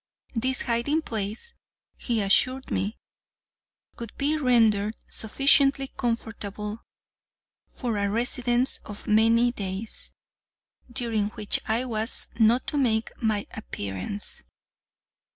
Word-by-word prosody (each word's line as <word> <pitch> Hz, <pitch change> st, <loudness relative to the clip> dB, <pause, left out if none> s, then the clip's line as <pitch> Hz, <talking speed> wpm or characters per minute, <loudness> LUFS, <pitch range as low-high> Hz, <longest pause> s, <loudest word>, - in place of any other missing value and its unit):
This 255 Hz, +2 st, +1 dB
hiding 245 Hz, +7 st, +1 dB
place, 220 Hz, -, -3 dB, 0.4 s
he 230 Hz, -3 st, -1 dB
assured 255 Hz, +7 st, +3 dB
me, 205 Hz, +4 st, -1 dB, 1.0 s
would 230 Hz, -2 st, -6 dB
be 290 Hz, +2 st, +2 dB
rendered 225 Hz, -7 st, +3 dB
sufficiently 275 Hz, +3 st, +3 dB
comfortable 220 Hz, -3 st, -4 dB, 0.9 s
for 235 Hz, -4 st, -3 dB
a 200 Hz, 0 st, +1 dB
residence 245 Hz, +3 st, +1 dB
of 205 Hz, -1 st, -9 dB
many 230 Hz, +3 st, +4 dB
days, 200 Hz, -1 st, -5 dB, 0.8 s
during 230 Hz, -5 st, 0 dB
which 210 Hz, -1 st, -1 dB
I 230 Hz, +3 st, +1 dB
was 225 Hz, -1 st, -1 dB
not 230 Hz, +3 st, +4 dB
to 295 Hz, -, 0 dB
make 225 Hz, -4 st, +1 dB
my 215 Hz, -3 st, +1 dB
appearance. 100 Hz, -, -5 dB
230 Hz, 100 wpm, -26 LUFS, 210-250 Hz, 1.0 s, many